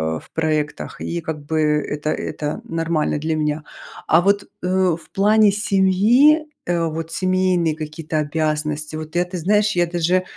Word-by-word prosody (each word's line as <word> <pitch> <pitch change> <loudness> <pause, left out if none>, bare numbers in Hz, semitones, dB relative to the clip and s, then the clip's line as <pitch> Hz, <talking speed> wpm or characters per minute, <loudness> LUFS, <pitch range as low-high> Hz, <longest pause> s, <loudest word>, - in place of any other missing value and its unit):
а, - - -4
в - - -19
проектах, 155 -2 -2
и 170 0 -3
как 150 -2 -6
бы 160 +1 -1
это 150 0 0
это 150 0 -4
нормально 165 -2 -1
для 160 +1 -1
меня. 150 0 -1 0.4
А 165 +2 +5
вот, 200 +2 +2 0.2
э, 180 - -3 0.3
в - - -20
плане 210 +1 +4
семьи, 210 +10 +4 0.2
э, 170 -1 0
вот 160 +1 -5
семейные 185 -3 +1
какие-то 155 0 -5
обязанности, 150 0 -2
вот 155 +1 -8
я 175 - +3
ты 180 0 -6
знаешь, 210 +5 +2
я 175 0 +3
даже, 175 +2 +1
165 Hz, 160 wpm, -21 LUFS, 155-185 Hz, 0.4 s, А